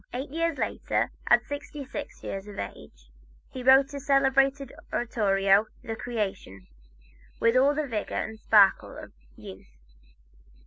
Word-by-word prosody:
Eight 265 +2 -5
years 330 -1 -1
later, - - -1 0.2
at - - +4
sixty 285 0 -7
six 285 +2 -8
years 195 +1 -6
of 205 - -10
age, - - -9 0.4
he 255 - -7
wrote 265 +2 +5
his 280 -1 -8
celebrated 275 0 +2 0.2
oratorio 200 -3 +2 0.2
"The 225 - -5
Creation," 205 - -5 0.7
with 230 +1 +3
all 275 +3 +4
the 305 0 -1
vigor 225 -6 -4
and 220 0 -4
sparkle 205 -3 +3
of - - -10 0.2
youth. 65 -10 -13
245 Hz, 135 wpm, -27 LUFS, 200-275 Hz, 0.7 s, wrote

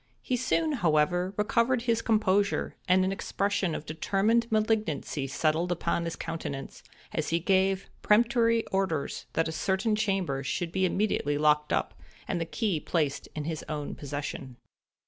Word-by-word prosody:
He 255 - 0
soon, 310 +6 +1
however, 175 - +2
recovered 235 +3 +2
his 230 -2 +1
composure, 205 -3 +1
and 185 0 +4
an 190 - 0
expression 195 -2 -1
of 150 - -6
determined 210 +9 +1
malignancy 215 -10 0
settled 160 +5 0
upon 170 0 0
his 165 - -3
countenance, 145 -5 -5 0.3
as - - -1
he 165 - +2
gave 190 +1 +2
peremptory 230 +1 +3
orders 175 -7 -1
that 165 - +1
a - - -3
certain 190 +6 0
chamber 195 -10 0
should 165 +5 -2
be 190 +1 +1
immediately 180 -7 0
locked 150 0 +3
up, - - 0 0.3
and 170 - -1
the - - 0
key 195 -2 -1
placed 145 -3 -1
in 155 - -3
his 160 0 -4
own 150 -2 -3
possession. 140 -3 -6
185 Hz, 150 wpm, -28 LUFS, 155-215 Hz, 0.3 s, and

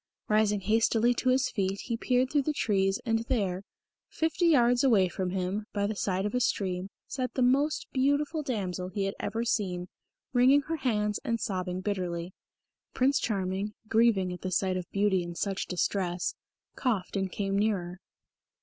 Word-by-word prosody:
Rising 210 -1 +2
hastily 225 +3 +3
to 255 +2 0
his 260 +2 +2
feet 195 -1 -1
he 235 - -3
peered 250 +2 +1
through 295 - +3
the 300 +2 -1
trees, 195 -3 +1
and 225 -1 +2
there, 195 -7 -1 0.5
fifty 325 +2 0
yards 245 -5 +4
away 215 -8 +5
from 185 +1 -3
him, 190 +3 -2
by 200 -1 0
the 215 +1 -2
side 190 -1 -1
of 210 - -2
a 250 - +2
stream 190 -5 -1 0.2
sat 255 -2 -4
the 255 - +2
most 280 +5 +2
beautiful 285 +4 +1
damsel 190 -9 -3
he 195 +2 -2
had 195 0 -1
ever 230 +1 -2
seen, 180 -6 -1 0.4
wringing 260 +3 +5
her 325 +3 -3
hands 210 -6 0
and 230 0 -1
sobbing 185 -3 -3
bitterly. 180 -3 -3 0.6
Prince 270 +2 +3
Charming, 195 0 -2
grieving 220 -5 +3
at 180 - -9
the 185 - -3
sight 185 +1 +1
of 180 -1 -4
beauty 200 -2 +2
in 175 0 -6
such 195 +1 -2
distress, 180 -1 -1 0.4
coughed 215 -9 -1
and 190 -1 -1
came 195 0 -2
nearer. 190 -4 0
205 Hz, 170 wpm, -29 LUFS, 185-245 Hz, 0.6 s, away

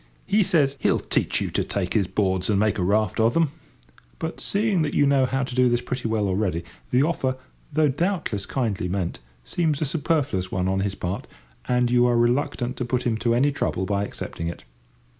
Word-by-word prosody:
He 205 +2 +3
says 145 -7 +2
he'll - - +2
teach - - 0
you - - -2
to - - 0
take 90 -3 -2
his 100 -5 +2
boards 95 -2 0
and 100 -2 +3
make 105 0 +1
a - - +1
raft 105 +3 +1
of 115 +1 +3
them; 165 -4 +3 0.7
but, 160 - -4
seeing 200 -3 +1
that 150 -2 -1
you 145 - +4
know 140 -2 +3
how 135 +1 0
to 130 - -5
do 125 0 +4
this 120 0 +2
pretty 125 0 -3
well 110 -2 0
already, 95 -3 0 0.3
the 125 +2 +3
offer, 130 -5 0 0.3
though 155 +1 +3
doubtless 145 - -1
kindly 105 -9 -1
meant, 90 -2 -2 0.2
seems 155 - 0
a 155 - 0
superfluous 145 - 0
one 90 0 0
on 95 0 +1
his 100 0 -1
part, 90 +1 -4 0.4
and 125 -1 +2
you 125 0 +5
are 120 -1 +3
reluctant 125 +1 0
to - - -2
put 125 +1 -1
him 120 -2 +1
to 115 +1 +1
any 140 +4 +3
trouble 95 -8 -1
by 100 +1 0
accepting 85 -4 -5
it. 85 - -6
120 Hz, 210 wpm, -24 LUFS, 100-140 Hz, 0.7 s, you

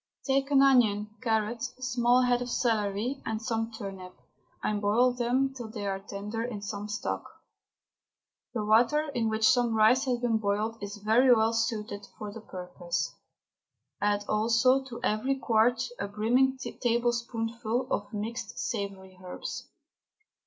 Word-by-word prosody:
Take 275 0 +1
an 275 -1 +5
onion, 215 -6 +4
carrot, 225 -1 0
small 250 -1 +1
head 245 0 +2
of 245 - -4
celery, 225 +2 0
and 220 -1 -2
some 225 0 -2
turnip, 195 -4 -8 0.5
and 210 -1 0
boil 235 +5 +3
them 250 +2 +1
till 245 -4 -7
they 215 -2 -5
are 195 -1 -1
tender 205 +3 -5
in 225 -4 -5
some 205 0 -5
stock. 210 - -3 1.3
The 215 -2 -1
water 245 +8 +3
in 225 -3 0
which 220 0 +2
some 240 -2 +3
rice 235 +5 +5
has 250 -2 +1
been 235 -2 +1
boiled 215 +2 -1
is 205 0 -6
very 225 +5 +4
well 225 -1 +4
suited 220 -3 -2
for 210 -1 -6
the 225 - -9
purpose. 175 -5 -4 0.9
Add 205 0 +1
also 230 +5 +3
to 245 -3 -8
every 235 +6 +1
quart 240 -2 +2
a - - -2
brimming 245 +6 +2
tablespoonful 235 -1 -1
of 205 0 -2
mixed 225 +1 -5
savoury 195 -3 -4
herbs. 180 - -6
225 Hz, 145 wpm, -29 LUFS, 210-245 Hz, 1.3 s, an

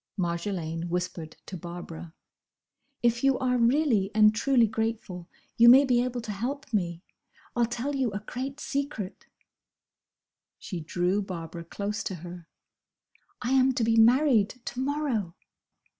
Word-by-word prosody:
Marjolaine 170 -2 -2
whispered 175 -2 -4
to 190 - -7
Barbara. 170 -1 -8 0.9
"If 235 +1 +2
you 270 -1 +4
are 250 -1 +1
really 235 -5 +3
and 215 0 +6
truly 240 +1 +3
grateful, 220 -5 -3 0.3
you 235 +1 +8
may 265 +3 +8
be 245 -2 +3
able 250 -1 -3
to 220 - -5
help 255 +6 -4
me! 175 -4 -1 0.5
I'll 240 -1 +2
tell 240 +5 -3
you 265 -3 +1
a 200 - -3
great 265 +6 -6
secret." 275 -11 -4 1.3
She 180 - -6
drew 175 +5 0
Barbara 170 -3 -6
close 200 +5 -4
to 190 - -3
her. 175 0 -10 1.0
"I 245 - -1
am 265 0 +4
to 245 - +1
be 225 0 +2
married 230 -1 +5
to 250 +1 -8
morrow!" 260 - -1
220 Hz, 140 wpm, -27 LUFS, 180-255 Hz, 1.3 s, you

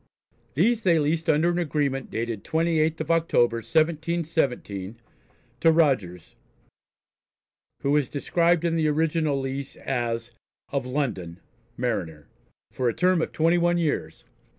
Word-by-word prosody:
These 220 - +2
they 175 -5 +3
leased 160 +2 0
under 160 +3 +3
an 175 - -1
agreement 145 -5 -1
dated 115 -2 -4
28th 160 -1 +1
of 155 +1 -2
October, 140 -8 +2
1717, 155 - -1 0.6
to 165 - +5
Rogers, 125 - 0 1.5
who 140 +1 +2
is 145 -4 +1
described 170 +3 +1
in 165 -1 +1
the 160 -2 +1
original 155 -1 +1
lease 135 +1 -5
as 120 -2 -3 0.4
"of 135 -2 -2
London, 115 - -3 0.4
Mariner," 90 - -3 0.5
for 125 -2 0
a - - -3
term 180 -1 +2
of - - -2
twenty 165 +2 +2
one 175 0 +2
years. 145 - -2
150 Hz, 130 wpm, -25 LUFS, 120-165 Hz, 1.5 s, to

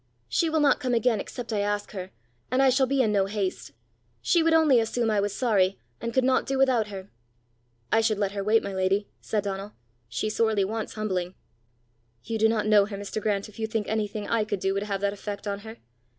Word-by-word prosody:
She 325 - +1
will 315 -1 +1
not 285 - +4
come 255 -4 0
again 230 -1 +2
except 240 +2 -6
I 210 - 0
ask 205 0 -1
her; 185 -2 -6 0.4
and 255 - +1
I 270 -1 +5
shall 265 +1 +3
be 270 0 +2
in 215 - +1
no 195 -2 +2
haste: 190 - -3 0.5
she 335 - +2
would 325 0 +3
only 305 -6 +5
assume 225 0 0
I 210 - +2
was 205 0 0
sorry, 195 -6 +2 0.2
and 235 - -3
could 260 +2 +2
not 260 0 +2
do 270 - 0
without 255 -5 +3
her!" 195 -1 -9 0.8
"I 225 - +4
should 220 -1 +1
let 200 -1 0
her 200 -1 -3
wait, 220 +2 +3
my 200 - -4
lady!" 190 +2 0
said 210 -2 -1
Donal. 200 +1 -5 0.4
"She 120 - -2
sorely 215 -1 +1
wants 220 +2 -4
humbling!" 185 -4 -2 0.9
"You 225 -1 -3
do 220 +1 +5
not 220 -2 0
know 210 -2 +5
her, 205 -2 -6
Mr. 205 +2 -5
Grant, 200 -2 -1
if 215 +1 -15
you 220 - -1
think 220 -1 -2
anything 215 -1 -2
I 230 -2 +1
could 210 -2 -3
do 195 +1 0
would 200 - -1
have 200 -1 -3
that 200 0 +1
effect 205 0 -6
on 200 -1 -2
her." 220 +2 -10
215 Hz, 230 wpm, -26 LUFS, 200-230 Hz, 0.9 s, I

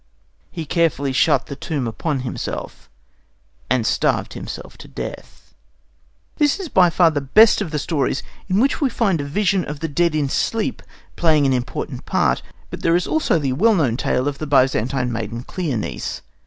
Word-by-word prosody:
He 165 -2 -6
carefully 145 -4 +1
shut - - +3
the 140 - -7
tomb 140 -3 -3
upon 135 +4 -2
himself, 125 -1 -6 0.8
and 125 -3 +1
starved - - +1
himself - - -8
to - - -11
death. - - -9 0.8
This 295 +4 +2
is 370 -5 -5
by 180 -6 +5
far 165 0 +4
the 145 -2 -1
best 210 +12 +5
of 195 - -2
the 150 - -2
stories 145 -2 -1 0.3
in 190 +2 +2
which 275 +6 +2
we 275 - +3
find 200 -9 +1
a - - -3
vision 185 +5 +1
of 150 -1 -6
the 165 - -2
dead 165 +2 +1
in 150 -2 +1
sleep 220 +10 -1 0.3
playing 155 -4 +3
an 135 - +3
important 125 -1 -4
part; - - +1 0.3
but - - -6
there 165 0 +3
is 175 - +1
also 315 - +1
the 140 -4 -1
well 215 - +4
known 135 -10 +1
tale 130 +1 0
of 140 -1 -3
the 155 - -4
Byzantine 130 -2 +2
maiden 115 +1 -4
Cleonice. 125 - -4
150 Hz, 180 wpm, -21 LUFS, 130-180 Hz, 0.8 s, by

